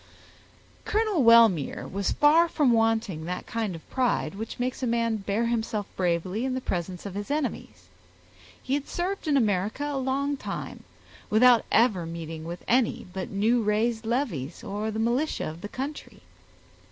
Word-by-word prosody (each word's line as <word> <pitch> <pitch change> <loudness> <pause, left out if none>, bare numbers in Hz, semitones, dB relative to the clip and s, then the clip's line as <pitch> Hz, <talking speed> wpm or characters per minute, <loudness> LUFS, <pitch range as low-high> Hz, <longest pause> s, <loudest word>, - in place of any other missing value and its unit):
Colonel 425 -8 +1
Wellmere 230 - +5
was 200 0 -2
far 325 +3 +5
from 290 -6 +2
wanting 225 -7 +1
that 180 +1 -4
kind 220 -6 -3
of 165 - -12
pride 245 -11 0
which 215 +3 -6
makes 250 +2 -2
a 255 - 0
man 230 -1 +1
bear 205 +3 -1
himself 220 -3 -1
bravely 180 +4 -1
in 260 -1 -1
the - - -1
presence 180 -5 -4
of 200 - -5
his 205 +3 -5
enemies. 255 - -3 0.8
He 260 - -2
had 285 0 -1
served 365 0 -3
in 290 -2 +3
America 215 +3 0
a 290 -2 -2
long 275 +2 -1
time, - - -6 0.4
without 240 +2 +5
ever 210 -8 +3
meeting 165 -1 -6
with 170 +1 -7
any 245 -1 +1
but 190 -1 -4
new 220 +5 +2
raised 220 +2 0
levies, 220 - -2
or 205 +2 -3
the 220 - -4
militia 240 +7 0
of 160 +2 -7
the 205 - -6
country. 275 +6 -6
225 Hz, 165 wpm, -26 LUFS, 195-260 Hz, 0.8 s, Wellmere